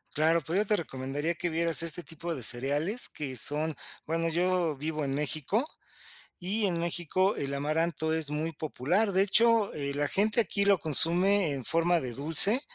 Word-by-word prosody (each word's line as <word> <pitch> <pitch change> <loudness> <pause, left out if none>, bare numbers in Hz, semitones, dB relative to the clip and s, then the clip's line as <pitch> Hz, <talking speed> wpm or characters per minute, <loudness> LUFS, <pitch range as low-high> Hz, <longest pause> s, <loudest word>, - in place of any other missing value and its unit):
Claro, 160 +2 +1
pues 165 +5 -4
yo 210 - -1
te 210 - 0
recomendaría 145 0 -5
que 175 +1 -4
vieras 165 0 +3
este 165 +1 +4
tipo 165 +1 -8
de 130 - -9
cereales 145 - +2
que 135 -4 -7
son 150 +3 +4 0.3
bueno, 165 +1 -3
yo 175 -1 -2
vivo 155 +2 -5
en 135 -1 -4
México, 155 - -3 0.7
y 205 +4 -3
en 175 -3 -3
México 175 +3 -2
el 140 0 -5
amaranto 160 +2 -3
es 160 -2 -2
muy 155 +2 -5
popular. 160 - -2
De 190 - +2
hecho, 225 +1 +2
eh, 140 -1 -5
la 145 0 -2
gente 210 +7 +1
aquí 200 -3 -2
lo 200 -1 +2
consume 175 +4 +2
en 135 -3 -7
forma 170 +3 0
de 125 -2 -6
dulce, 165 - +7
165 Hz, 180 wpm, -26 LUFS, 145-185 Hz, 0.7 s, dulce